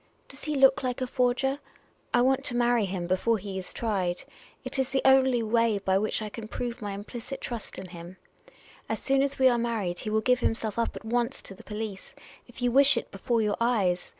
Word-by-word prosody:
Does 270 - -10
he 305 -1 -1
look 270 -1 +5
like 250 -1 -2
a 255 - -1
forger? 255 +2 +1 0.5
I 240 - +4
want 265 +1 +2
to 245 - 0
marry 240 -2 +3
him 185 -2 -3
before 185 +6 +1
he 195 -1 -5
is 185 - -6
tried. 190 -6 -1 0.4
It 275 - -3
is 265 - +1
the 270 0 0
only 265 -3 +5
way 230 -1 +2
by 190 -1 +1
which 215 +1 -1
I 210 - -4
can 215 +1 -8
prove 240 +1 -5
my 205 -1 -4
implicit 235 +6 -7
trust 235 -3 -6
in 185 -1 -7
him. 175 +1 -10 0.7
As - - 0
soon 270 0 +2
as 280 0 +1
we 260 - +5
are 240 -2 +3
married, 215 -7 -1
he 215 - -4
will 220 0 +1
give 250 +2 +3
himself 225 -1 0
up 230 - -1
at - - -9
once 240 +3 0
to - - -7
the 190 - -14
police 210 +2 -6 0.2
— - - -23
if 245 0 -9
you 245 - +2
wish 275 0 +5
it, - - -4
before 230 +3 0
your 210 -1 0
eyes. 200 -7 +1
230 Hz, 230 wpm, -27 LUFS, 205-255 Hz, 0.7 s, look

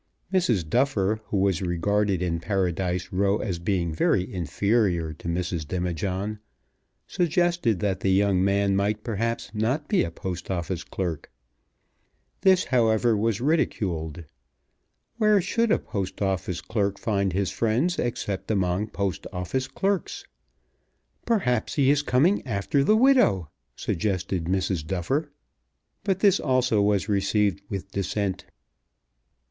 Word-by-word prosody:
Mrs. 120 - +2
Duffer, 110 - +1
who 105 - -2
was 95 -2 +1
regarded 95 +2 0
in 85 -2 -1
Paradise 90 -1 -1
Row 100 +2 +2
as 90 -6 -3
being 85 -2 -1
very 90 +4 +1
inferior 90 -1 0
to 80 - -10
Mrs. 85 -2 -2
Demijohn, 95 +4 -2 0.7
suggested 170 - +1
that 95 -2 0
the 95 - 0
young 95 -1 +3
man 100 0 +2
might, 105 +2 0
perhaps, 115 -1 -2
not 125 +8 -1
be 205 - +2
a - - -2
Post 90 +1 -6
Office 90 -1 -2
clerk. 85 -5 -4 1.1
This, 190 -1 +5
however, 115 -2 +2
was 110 0 0
ridiculed. 90 - -1 0.9
Where 215 -2 +4
should 225 +5 0
a - - +5
Post 95 -2 -5
Office 95 -2 -1
clerk 100 -3 -1
find 100 -3 0
his 95 +1 -1
friends 125 +11 0
except 105 -5 -3
among 95 -1 0
Post 100 -3 -3
Office 100 +8 -2
clerks? 195 +8 -2 1.0
"Perhaps 125 - +1
he 140 -2 +4
is 145 0 +2
coming 145 +8 +2
after 110 +6 0
the 215 +9 +4
widow," 225 - +4 0.2
suggested 95 -2 -2
Mrs. 95 -2 0
Duffer. 115 - -2 0.7
But 195 -2 0
this 200 -3 +5
also 130 -6 +2
was 100 -1 +1
received 100 -1 +1
with 95 -1 -5
dissent. 95 -1 -2
Mrs. - - -30
100 Hz, 130 wpm, -25 LUFS, 90-120 Hz, 1.1 s, This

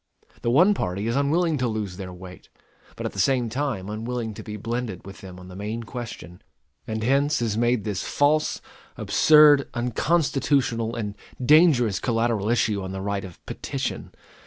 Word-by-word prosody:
The 120 - 0
one 175 - +5
party 100 - -3
is 115 +1 -1
unwilling 155 +2 +1
to 125 - +1
lose 105 -5 -4
their 95 -2 -7
weight, 90 0 -12 0.5
but - - -6
at - - -3
the - - -6
same 125 -4 +2
time 125 -6 -3
unwilling 110 +1 -4
to - - -9
be 105 -1 -7
blended 115 -3 -4
with 95 0 -11
them 90 -1 -10
on 90 - -12
the 90 - -11
main 105 +4 -4
question; 115 -8 -8 0.5
and 110 0 -3
hence 140 +5 +2
is 115 -3 -1
made 120 -1 +1
this 105 -2 -3
false, 150 +2 +1 0.4
absurd, 150 -2 +5
unconstitutional, 125 -2 0
and 105 -3 -3 0.3
dangerous 140 - +5
collateral 115 -3 0
issue 110 -4 +1
on 95 0 -6
the 95 - -4
right 100 0 -2
of 90 -3 -12
petition. - - -4
115 Hz, 170 wpm, -24 LUFS, 100-135 Hz, 0.5 s, one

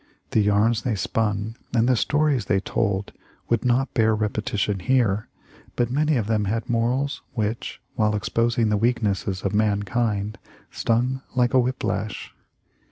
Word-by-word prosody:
The 110 - +3
yarns 105 +3 +3
they 115 -2 -1
spun 105 +2 -1 0.2
and 115 0 +3
the 130 - +4
stories 145 -2 +1
they 100 - +2
told 100 -1 -1 0.4
would 115 -1 +1
not 125 +2 +1
bear 110 -2 +3
repetition 105 -1 -1
here, 110 -2 +1 0.5
but 120 0 0
many 150 +3 +2
of 115 - 0
them 105 -1 +1
had 110 +3 -2
morals 125 +5 0
which, 110 0 -2
while 105 -3 +1
exposing 115 +2 +1
the 105 - +2
weaknesses 100 -5 0
of 100 - -1
mankind, 105 0 0 0.3
stung 125 +3 0
like 125 -1 +2
a 130 - +6
whip 125 +1 -1
lash. 105 -2 -3
110 Hz, 150 wpm, -24 LUFS, 105-120 Hz, 0.5 s, a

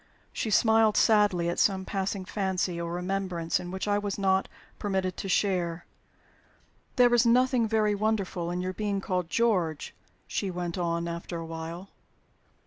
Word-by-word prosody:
She 225 - -2
smiled 220 0 +4
sadly 205 -6 +4
at 170 - -1
some 190 -2 +2
passing 195 -1 -3
fancy 185 -3 -1
or 170 0 -4
remembrance 180 -2 -2
in 175 - -7
which 190 +2 -4
I 205 0 +2
was 205 -1 -3
not 190 -1 +2 0.3
permitted 190 -3 -1
to 195 - -5
share. 175 -3 0 1.1
"There 245 -1 +5
is 240 - +5
nothing 245 0 +3
very 215 -1 +2
wonderful 200 -5 -1
in 175 +1 -2
your 185 0 -3
being 205 -1 -2
called 180 -3 -2
'George,'" 180 -9 0 0.3
she 200 - -2
went 175 -1 -4
on, 170 -1 -1
after 170 +1 -5
a 165 - -5
while. 165 +3 -7
190 Hz, 155 wpm, -28 LUFS, 175-210 Hz, 1.1 s, There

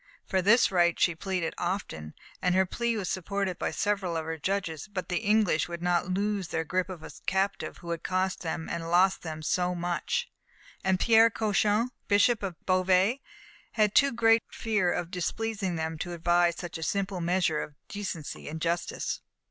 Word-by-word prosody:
For 190 - +1
this 210 +5 +5
right 175 -2 +3
she 175 - +4
pleaded 180 0 -2
often, 175 - -3 0.3
and 180 0 +2
her 190 0 +4
plea 235 +4 -1
was 195 -4 -3
supported 190 0 -2
by - - 0
several 195 -5 -1
of 160 - -3
her 160 0 -4
judges. 185 -2 -2
But 185 -3 -4
the 180 - 0
English 210 -7 +2
would 170 0 -6
not 175 0 +1
lose 200 -1 -1
their 160 - -1
grip 185 +3 -1
of 175 -4 -8
a - - -8 0.2
captive 195 +1 -1
who 170 - -7
had 170 - -3
cost 185 0 -1
them 160 -1 -3
and 165 -1 -4
lost 185 +2 +4
them 155 -2 -6
so 180 +3 0
much, 175 - -1 0.6
and 190 -1 +2
Pierre 225 0 +6
Cauchon, 215 +2 +1 0.2
Bishop 210 +3 +4
of 190 -4 -3
Beauvais, 185 +6 +3 0.5
had 215 -2 +2
too 280 0 +5
great 225 -1 +4
fear 210 -6 0
of 175 0 -3
displeasing 200 0 -2
them 160 0 -3
to 175 +2 -4
advise 175 0 +2
such 175 -2 -6
a - - -8
simple 195 +2 -1
measure 170 -2 +1
of 150 - -8
decency 190 -10 -5
and 160 +1 -5
justice. 170 +1 -2
185 Hz, 180 wpm, -28 LUFS, 170-205 Hz, 0.6 s, Pierre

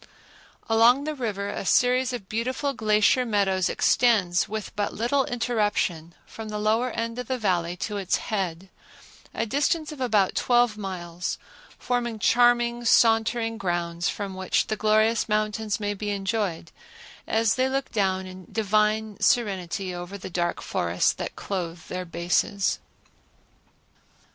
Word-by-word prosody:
Along 235 +4 +5
the 310 +1 -2
river 210 -7 -3
a - - -4
series 250 +5 +3
of 235 -6 -6
beautiful 255 +6 -2
glacier 215 +2 +3
meadows 195 -5 +1
extend 200 -8 +3
with 215 -2 -5
but 205 -1 -2
little 255 +5 +1
interruption, 210 -8 -1
from 220 -1 -9
the 210 - -4
lower 220 +4 +1
end 230 0 -3
of 250 - -5
the 260 - -1
Valley 180 -5 0
to 210 -1 -4
its 195 -1 0
head, 190 -3 -3 0.6
a - - -2
distance 295 +6 0
of 295 -3 -9
about 210 -6 +2
twelve 240 -3 +2
miles, 180 -4 -5 0.4
forming 240 -2 -2
charming 240 +1 +3
sauntering 225 0 +3
grounds 175 -1 -1
from 200 -2 -4
which 190 0 0
the 220 - -2
glorious 215 +2 +2
mountains 215 0 0
may 205 -1 -1
be 205 +1 -4
enjoyed 195 -4 -2 0.6
as 220 -1 +2
they 260 +1 +1
look 270 0 -2
down 190 -3 0
in 185 -1 -11
divine 215 0 +1
serenity 190 -4 0
over 175 +3 -6
the 190 - -8
dark 175 0 -1
forests - - +1
that - - -6
clothe 175 -4 -4
their 180 0 -4
bases. 175 +4 0
215 Hz, 140 wpm, -25 LUFS, 190-235 Hz, 0.6 s, Along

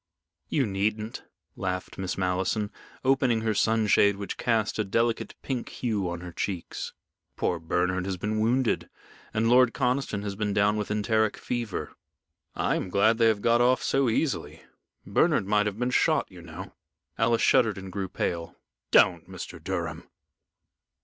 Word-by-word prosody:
"You 140 -4 +2
needn't," 105 +2 -2 0.3
laughed 95 0 -4
Miss 95 -1 -3
Malleson, 95 +3 0 0.3
opening 130 -4 +3
her 110 -1 0
sunshade 105 -2 +3
which 100 0 -5
cast 110 -2 0
a - - +3
delicate 115 +3 0
pink 130 -3 -3
hue 105 -7 -2
on 85 0 -5
her 90 0 -7
cheeks. 90 0 -4 0.4
"Poor 85 - 0
Bernard 90 +3 0
has 95 -1 -2
been 105 +3 -2
wounded 120 +2 +1 0.4
and 110 +1 +1
Lord 125 0 +5
Conniston 125 -5 0
has 100 -1 -3
been 105 0 -1
down 105 +1 +3
with 105 -1 -3
enteric 110 +1 +1
fever." 120 -5 -3 0.6
"I - - +1
am - - -4
glad 110 +5 +3
they 115 - +5
have 110 -2 +1
got 120 0 +4
off 125 +1 +3
so 135 -2 +2
easily. 135 +5 -1 0.4
Bernard - - +2
might 105 +1 +2
have 105 -1 -3
been 125 +2 0
shot, - - +2
you - - -11
know." - - -9 0.5
Alice 115 0 +3
shuddered 110 -4 +4
and 95 -1 -7
grew 95 -1 -3
pale. 85 -2 -3 0.3
"Don't, - - +4
Mr. - - -8
Durham!" - - -4
105 Hz, 155 wpm, -27 LUFS, 95-115 Hz, 0.6 s, Lord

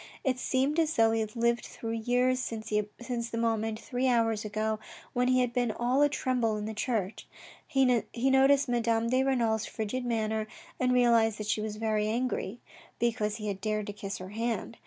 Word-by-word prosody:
It 255 -2 0
seemed 270 +5 +1
as 320 -1 +1
though 225 -1 +4
he 225 - +1
had 215 0 -3
lived 235 0 +1
through 225 - -6
years 245 +3 +1
since 225 -3 -5 0.6
the 230 - -4
moment, 225 -1 0
three 250 +2 -1
hours 225 -3 +2
ago, 215 0 -2 0.3
when 250 0 +1
he 255 0 +4
had 245 -1 0
been 245 -2 +1
all 245 +5 +1
atremble 255 -6 +1
in 210 - -4
the 220 - -4
church. 215 -2 -2 0.4
He 270 -1 +3 0.5
noticed 270 +1 +5
Madame 230 -1 +1
de 255 +1 +3
Renal's 230 -5 +1
frigid 225 +4 -3
manner 220 -2 -1 0.3
and 250 0 +2
realised 235 -3 +4
that 210 - -5
she 210 +1 0
was 215 -1 -4
very 215 -1 0
angry, 235 -1 -2 0.4
because 220 -3 0
he 215 -1 -5
had 195 -2 -3
dared 215 -1 -1
to 205 - -5
kiss 200 -1 -5
her 185 0 -8
hand. 230 +1 -3
230 Hz, 185 wpm, -29 LUFS, 215-250 Hz, 0.6 s, noticed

